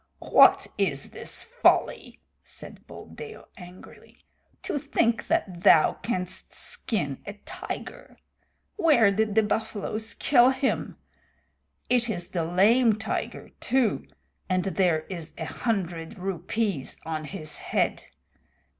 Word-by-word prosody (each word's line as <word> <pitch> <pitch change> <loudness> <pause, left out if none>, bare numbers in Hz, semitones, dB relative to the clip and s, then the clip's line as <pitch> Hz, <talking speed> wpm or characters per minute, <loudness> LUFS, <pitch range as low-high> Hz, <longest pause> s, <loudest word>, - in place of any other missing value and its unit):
"What - - +5
is - - -1
this - - -4
folly?" - - +1 0.2
said - - -12
Buldeo 440 -1 -11
angrily. 180 0 -14 0.5
"To 290 - -2
think 235 -5 0
that 195 - -1
thou 165 -5 +6
canst 185 -5 -4
skin 200 - -3
a 200 - -5
tiger! - - -8 0.6
Where 290 - +5
did 210 +1 0
the 220 - +5
buffaloes 220 +1 -3
kill 250 -3 +5
him? 265 0 -1 0.9
It 245 -1 +2
is 175 -5 -4
the 170 -3 -2
Lame 215 +7 +4
Tiger 220 - -4
too, 250 -4 +1 0.4
and 185 -1 +1
there 180 -4 +1
is 165 -1 -8
a 160 - -4
hundred 180 -3 -3
rupees 190 -2 -2
on 155 -1 -3
his 155 -2 -6
head. - - -1
200 Hz, 115 wpm, -26 LUFS, 175-235 Hz, 0.9 s, thou